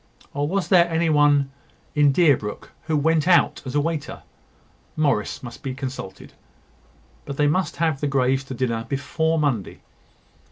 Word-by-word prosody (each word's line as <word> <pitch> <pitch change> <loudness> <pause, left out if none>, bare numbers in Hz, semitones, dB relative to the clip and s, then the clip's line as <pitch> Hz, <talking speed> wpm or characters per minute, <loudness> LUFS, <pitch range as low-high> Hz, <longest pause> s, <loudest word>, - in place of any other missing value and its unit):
Or 145 +1 -1
was 190 +3 -2
there 175 -2 +5
any 165 0 +1
one 145 -2 +3 0.4
in 145 -2 +4
Deerbrook 135 - +1
who 155 -1 0
went 160 +2 +1
out 180 - +3
as 130 - -5
a - - +4
waiter? 155 -1 -3 0.7
Morris 140 -10 0
must 120 - -9
be 130 -1 -5
consulted; 130 -8 -7 0.9
but 140 -1 -7
they 150 - +3
must 170 +6 0
have 160 -3 -1
the 145 - 0
Greys 135 -1 +1
to 135 - -7
dinner 115 -2 -1
before 160 +4 -1
Monday. 135 - -1
145 Hz, 155 wpm, -23 LUFS, 135-160 Hz, 0.9 s, there